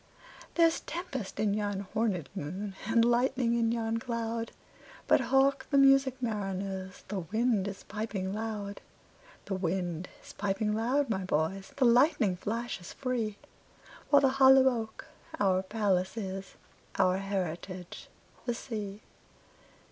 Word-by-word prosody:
There's 330 Hz, -1 st, +4 dB
tempest 280 Hz, -, -5 dB
in 210 Hz, -1 st, +2 dB
yon 205 Hz, -1 st, -2 dB
hornèd 210 Hz, -8 st, 0 dB
moon, 190 Hz, +4 st, -5 dB
And 230 Hz, 0 st, +4 dB
lightning 245 Hz, 0 st, +2 dB
in 230 Hz, -1 st, +2 dB
yon 230 Hz, -1 st, -1 dB
cloud:But 230 Hz, -1 st, -2 dB
hark 270 Hz, 0 st, +2 dB
the 280 Hz, -, +3 dB
music, 270 Hz, -1 st, +5 dB
mariners! 195 Hz, -4 st, -3 dB
The 195 Hz, 0 st, -3 dB
wind 215 Hz, +3 st, +1 dB
is 200 Hz, -1 st, -6 dB
piping 205 Hz, -3 st, -3 dB
loud; 210 Hz, -2 st, -4 dB, 0.6 s
The 200 Hz, -, -3 dB
wind 180 Hz, -2 st, -2 dB
is -, -, -12 dB
piping 205 Hz, +1 st, -1 dB
loud, 250 Hz, +6 st, +1 dB
my 190 Hz, -2 st, -1 dB
boys, 185 Hz, +3 st, -1 dB
The 265 Hz, -, +3 dB
lightning 240 Hz, -, +4 dB
flashes 215 Hz, -1 st, -4 dB
free—While 255 Hz, +3 st, -2 dB
the 270 Hz, -, +6 dB
hollow 265 Hz, 0 st, +7 dB
oak 225 Hz, -3 st, -4 dB, 0.3 s
our 190 Hz, -2 st, +3 dB
palace 190 Hz, -1 st, 0 dB
is, 195 Hz, -2 st, -5 dB, 0.4 s
Our 185 Hz, 0 st, +3 dB
heritage 185 Hz, -2 st, -4 dB, 0.4 s
the 240 Hz, -, 0 dB
sea. 210 Hz, -4 st, -6 dB
215 Hz, 125 wpm, -30 LUFS, 190-240 Hz, 0.6 s, hollow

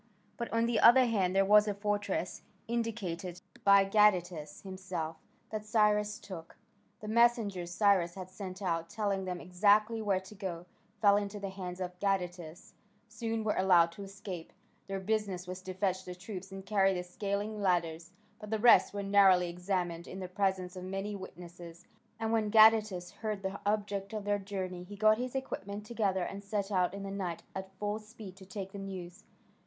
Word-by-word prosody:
But 235 Hz, -, -5 dB
on 230 Hz, 0 st, +2 dB
the 235 Hz, -2 st, +1 dB
other 255 Hz, +2 st, +8 dB
hand 195 Hz, -6 st, +1 dB
there 195 Hz, 0 st, +4 dB
was 210 Hz, +1 st, +6 dB
a 205 Hz, -, -1 dB
fortress, 205 Hz, -2 st, -2 dB, 0.3 s
indicated 195 Hz, -7 st, -3 dB, 0.2 s
by 200 Hz, -1 st, +7 dB
Gadatas 180 Hz, -7 st, +2 dB
himself, 185 Hz, -4 st, -5 dB, 0.3 s
that 215 Hz, -1 st, -3 dB
Cyrus 210 Hz, -1 st, +2 dB
took. 165 Hz, -4 st, -10 dB, 0.4 s
The 210 Hz, -, -7 dB
messengers 220 Hz, -6 st, +2 dB
Cyrus 180 Hz, -2 st, +3 dB
had 185 Hz, -1 st, -8 dB
sent 190 Hz, 0 st, -7 dB
out, 165 Hz, -2 st, -1 dB
telling 200 Hz, -3 st, -1 dB
them 180 Hz, -1 st, -3 dB
exactly 210 Hz, +5 st, +3 dB
where 200 Hz, -3 st, +1 dB
to 190 Hz, +2 st, -13 dB
go, 185 Hz, -4 st, -5 dB, 0.4 s
fell 205 Hz, -1 st, +6 dB
into 205 Hz, 0 st, -3 dB
the 200 Hz, -1 st, -5 dB
hands 185 Hz, -2 st, -6 dB
of 180 Hz, -1 st, -5 dB
Gadatas: 180 Hz, -4 st, -3 dB, 0.3 s
some 225 Hz, 0 st, -3 dB
were 215 Hz, -, +1 dB
allowed 175 Hz, -3 st, +5 dB
to 185 Hz, -, -11 dB
escape 195 Hz, -3 st, -8 dB, 0.4 s
their 195 Hz, 0 st, -3 dB
business 195 Hz, -2 st, -1 dB
was 185 Hz, +1 st, -6 dB
to 185 Hz, 0 st, -6 dB
fetch 190 Hz, -1 st, 0 dB
the 180 Hz, -1 st, -7 dB
troops 190 Hz, +1 st, -8 dB
and 195 Hz, 0 st, -8 dB
carry 195 Hz, -2 st, +3 dB
the 180 Hz, -, -2 dB
scaling 205 Hz, +3 st, -3 dB
ladders 170 Hz, -3 st, 0 dB, 0.3 s
but 210 Hz, -1 st, -9 dB
the 220 Hz, -, 0 dB
rest 225 Hz, -2 st, +6 dB
were 200 Hz, -, -2 dB
narrowly 195 Hz, -3 st, +5 dB
examined 175 Hz, -1 st, -2 dB
in 190 Hz, -, -7 dB
the 185 Hz, -, -5 dB
presence 190 Hz, -1 st, -1 dB
of 185 Hz, -, -7 dB
many 195 Hz, +2 st, -4 dB
witnesses, 175 Hz, -2 st, -10 dB, 0.3 s
and 225 Hz, 0 st, -1 dB
when 220 Hz, -2 st, +1 dB
Gadatas 215 Hz, -4 st, +5 dB
heard 215 Hz, -3 st, -4 dB
the 190 Hz, +1 st, -3 dB
object 205 Hz, -1 st, -1 dB
of 210 Hz, -2 st, -4 dB
their 205 Hz, 0 st, +1 dB
journey 190 Hz, -2 st, -5 dB
he 200 Hz, +3 st, -10 dB
got 215 Hz, +2 st, +4 dB
his 250 Hz, +1 st, -4 dB
equipment 205 Hz, -6 st, -4 dB
together 205 Hz, -5 st, 0 dB
and 200 Hz, +3 st, -6 dB
set 200 Hz, 0 st, -2 dB
out 185 Hz, -1 st, +1 dB
in 200 Hz, -, -6 dB
the 195 Hz, -, -5 dB
night 185 Hz, -4 st, -4 dB
at 190 Hz, 0 st, -7 dB
full 210 Hz, +1 st, -2 dB
speed 215 Hz, -3 st, -11 dB
to 190 Hz, -, -12 dB
take 195 Hz, 0 st, -6 dB
the 200 Hz, -, -7 dB
news. 190 Hz, 0 st, -8 dB
195 Hz, 180 wpm, -32 LUFS, 180-210 Hz, 0.4 s, other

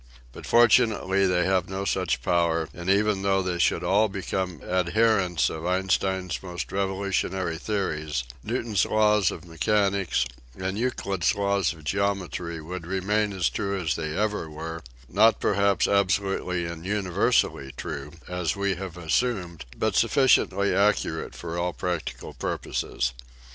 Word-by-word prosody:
But -, -, -10 dB
fortimately 110 Hz, -5 st, +4 dB
they 90 Hz, -1 st, +2 dB
have 95 Hz, -1 st, +1 dB
no 95 Hz, +1 st, -3 dB
such 60 Hz, -7 st, 0 dB
power 85 Hz, -1 st, +1 dB
and 85 Hz, +1 st, -5 dB
even 100 Hz, 0 st, +3 dB
though 95 Hz, -1 st, +2 dB
they 90 Hz, -1 st, -2 dB
should -, -, +2 dB
all 105 Hz, +3 st, +3 dB
become 95 Hz, -3 st, -3 dB
adherents 90 Hz, 0 st, +2 dB
of 80 Hz, 0 st, -5 dB
Einstein's 95 Hz, -2 st, 0 dB
most 90 Hz, -2 st, -6 dB
revolutionary 95 Hz, -3 st, -1 dB
theories, 80 Hz, -, -2 dB, 0.2 s
Newton's 115 Hz, -4 st, 0 dB
laws 105 Hz, -3 st, +3 dB
of -, -, -7 dB
mechanics 95 Hz, -, +1 dB, 0.3 s
and 95 Hz, +1 st, -3 dB
Euclid's 105 Hz, -6 st, 0 dB
laws 100 Hz, -1 st, +1 dB
of 80 Hz, -2 st, -12 dB
geometry 90 Hz, -1 st, -2 dB
would 85 Hz, +2 st, -7 dB
remain 105 Hz, +3 st, 0 dB
as 95 Hz, -6 st, 0 dB
true 100 Hz, -, -2 dB
as 80 Hz, -3 st, 0 dB
they 80 Hz, 0 st, -3 dB
ever 105 Hz, -6 st, -1 dB
were, 80 Hz, +2 st, -6 dB, 0.3 s
not 110 Hz, -, +4 dB
perhaps 100 Hz, -1 st, +2 dB
absolutely 95 Hz, -2 st, +1 dB
and 85 Hz, -1 st, -6 dB
universally 90 Hz, -8 st, +1 dB
true, 70 Hz, -1 st, -5 dB, 0.2 s
as 90 Hz, -3 st, -1 dB
we 100 Hz, 0 st, 0 dB
have 90 Hz, -1 st, -7 dB
assumed, 90 Hz, -, -1 dB
but -, -, 0 dB
suffi 135 Hz, -, +3 dB
ciently 100 Hz, -5 st, +3 dB
accurate 105 Hz, +1 st, +1 dB
for 85 Hz, 0 st, -5 dB
all 90 Hz, 0 st, -1 dB
practical 90 Hz, -3 st, -4 dB
purposes. -, -, -2 dB
95 Hz, 140 wpm, -26 LUFS, 85-100 Hz, 0.3 s, fortimately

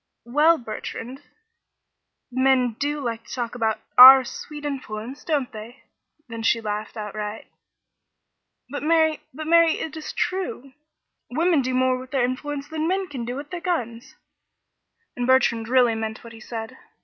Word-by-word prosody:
"Well, 300 Hz, +7 st, +4 dB
Bertrand? 245 Hz, +2 st, -7 dB, 1.1 s
Men 260 Hz, -1 st, +2 dB
do 295 Hz, +1 st, -1 dB
like 230 Hz, -4 st, -4 dB
to -, -, -9 dB
talk 240 Hz, -2 st, -3 dB
about 220 Hz, -2 st, -1 dB, 0.2 s
our 260 Hz, +1 st, +12 dB
'sweet 295 Hz, +4 st, -8 dB
influence,' 260 Hz, -2 st, -6 dB
don't 290 Hz, -6 st, -1 dB
they?" 225 Hz, +4 st, -11 dB, 0.4 s
Then 230 Hz, -1 st, -7 dB
she 230 Hz, +1 st, +2 dB
laughed 215 Hz, 0 st, -5 dB
outright. 210 Hz, 0 st, -5 dB, 1.2 s
"But, 285 Hz, +3 st, -6 dB
Mary 315 Hz, 0 st, +2 dB
but, 310 Hz, +4 st, -7 dB
Mary, 335 Hz, 0 st, +5 dB
it 315 Hz, -1 st, -5 dB
is 315 Hz, -, -6 dB
true. 350 Hz, -7 st, -3 dB, 0.6 s
Women 325 Hz, +3 st, +2 dB
do 255 Hz, 0 st, -2 dB
more 255 Hz, 0 st, +2 dB
with 255 Hz, 0 st, -10 dB
their 265 Hz, -3 st, +1 dB
influence 280 Hz, +3 st, -4 dB
than 315 Hz, 0 st, -3 dB
men 380 Hz, +1 st, -1 dB
can 255 Hz, -5 st, -5 dB
do 245 Hz, +1 st, -4 dB
with 285 Hz, +2 st, -8 dB
their 355 Hz, -1 st, -5 dB
guns," 240 Hz, -10 st, -3 dB, 1.0 s
and 245 Hz, 0 st, -2 dB
Bertrand 235 Hz, -4 st, +3 dB
really 250 Hz, -2 st, +4 dB
meant 220 Hz, 0 st, -5 dB
what 230 Hz, 0 st, -11 dB
he 225 Hz, -, -12 dB
said. 225 Hz, +2 st, -7 dB
255 Hz, 155 wpm, -23 LUFS, 230-295 Hz, 1.2 s, our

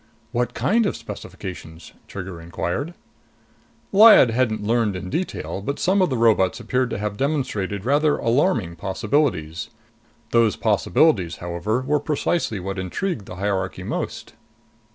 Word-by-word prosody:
"What 120 Hz, 0 st, -1 dB
kind 205 Hz, -, +2 dB
of -, -, -2 dB
specifications?" 85 Hz, -3 st, -9 dB
Trigger 95 Hz, -3 st, -7 dB
inquired. 90 Hz, -, -3 dB, 1.0 s
Lyad 210 Hz, -, +8 dB
hadn't 110 Hz, -3 st, 0 dB
learned 110 Hz, -2 st, +1 dB
in 90 Hz, 0 st, -6 dB
detail, 170 Hz, -, -3 dB
but 140 Hz, +8 st, -3 dB
some 190 Hz, +2 st, +2 dB
of 185 Hz, -, +3 dB
the 130 Hz, -, -1 dB
robots 110 Hz, -3 st, +3 dB
appeared 125 Hz, +2 st, 0 dB
to -, -, -3 dB
have 105 Hz, 0 st, -3 dB
demonstrated 120 Hz, -9 st, -2 dB
rather 145 Hz, +3 st, +3 dB
alarming 115 Hz, -, +1 dB
possibilities. 95 Hz, -, -1 dB, 0.6 s
Those 115 Hz, -3 st, +3 dB
possibilities, 90 Hz, -, +2 dB
however, 90 Hz, +8 st, -2 dB
were 145 Hz, +3 st, +1 dB
precisely 145 Hz, -, -1 dB
what 95 Hz, +1 st, -4 dB
intrigued 100 Hz, -, -3 dB
the -, -, -8 dB
hierarchy 100 Hz, 0 st, -2 dB
most. -, -, -4 dB
110 Hz, 130 wpm, -22 LUFS, 95-140 Hz, 1.0 s, Lyad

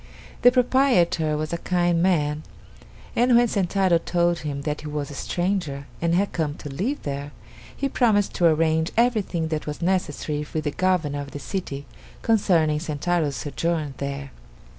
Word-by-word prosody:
The 245 Hz, -, +7 dB
proprietor 235 Hz, -, +3 dB
was 155 Hz, +2 st, -3 dB
a 170 Hz, -, -2 dB
kind 175 Hz, -2 st, +1 dB
man, 155 Hz, -5 st, +1 dB, 0.7 s
and 245 Hz, +1 st, +4 dB
when 240 Hz, 0 st, +5 dB
Sentaro 190 Hz, -4 st, +2 dB
told 175 Hz, 0 st, +1 dB
him 140 Hz, -2 st, -4 dB
that 150 Hz, 0 st, -2 dB
he 155 Hz, -, -7 dB
was 150 Hz, -1 st, -4 dB
a -, -, -7 dB
stranger 175 Hz, -3 st, -2 dB, 0.2 s
and 170 Hz, 0 st, +2 dB
had 200 Hz, +3 st, +1 dB
come 155 Hz, -3 st, -1 dB
to 145 Hz, -, -8 dB
live 240 Hz, -, -2 dB
there, 140 Hz, 0 st, -4 dB, 0.4 s
he 275 Hz, -, 0 dB
promised 220 Hz, -6 st, +2 dB
to 175 Hz, -, +5 dB
arrange 160 Hz, 0 st, +2 dB
everything 215 Hz, -9 st, +1 dB
that 155 Hz, -1 st, -3 dB
was 150 Hz, -, -4 dB
necessary 160 Hz, -4 st, -1 dB
with 155 Hz, -, 0 dB
the 145 Hz, -, -1 dB
governor 160 Hz, -5 st, 0 dB
of 140 Hz, -, -7 dB
the 145 Hz, -, -7 dB
city 140 Hz, -5 st, -5 dB, 0.4 s
concerning 165 Hz, -9 st, +3 dB
Sentaro's 155 Hz, -1 st, -1 dB
sojourn 155 Hz, +1 st, -2 dB
there. 140 Hz, -1 st, -5 dB
165 Hz, 160 wpm, -24 LUFS, 150-185 Hz, 0.7 s, The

